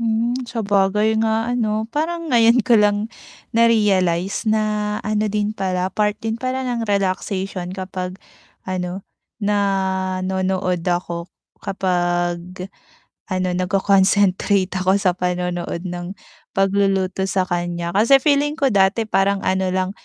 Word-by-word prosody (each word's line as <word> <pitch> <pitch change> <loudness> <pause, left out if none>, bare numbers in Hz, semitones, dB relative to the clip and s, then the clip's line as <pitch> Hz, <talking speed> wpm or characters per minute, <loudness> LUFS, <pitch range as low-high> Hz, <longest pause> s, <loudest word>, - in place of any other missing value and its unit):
Hmm, 230 +1 0 0.2
sabagay 210 0 +1
nga, 225 +2 0
ano, 220 -3 0
parang 330 0 -2
ngayon 235 0 +5
ko 235 -4 +5
lang 210 +2 +1 0.4
na-realize 200 -4 +2
na, 210 -1 0
ano 215 0 0
din 210 0 -1
pala, 185 -3 -2
part 210 0 0
din 225 +1 -4
pala 260 0 -2
ng 235 -3 -2
relaxation 190 -1 -1
kapag, 185 -1 -5 0.5
ano, 185 0 -4 0.3
nanonood 190 -3 0
ako, 175 -1 -2 0.3
kapag, 175 0 -2 0.6
ano, 185 -2 -1
nagko-concentrate 195 0 +2
ako 185 +1 +2
sa 195 -2 +2
panonood 180 -1 -3
ng 175 +1 -6 0.4
pagluluto 195 -1 +1
sa 190 -1 +1
kaniya. 175 -1 -3
Kasi 220 +8 +5
feeling 295 0 +2
ko 275 -5 +1
dati 200 +2 +3
parang 200 -2 +1
ano 190 0 +1
lang, 185 0 -1
195 Hz, 115 wpm, -20 LUFS, 185-215 Hz, 0.6 s, ngayon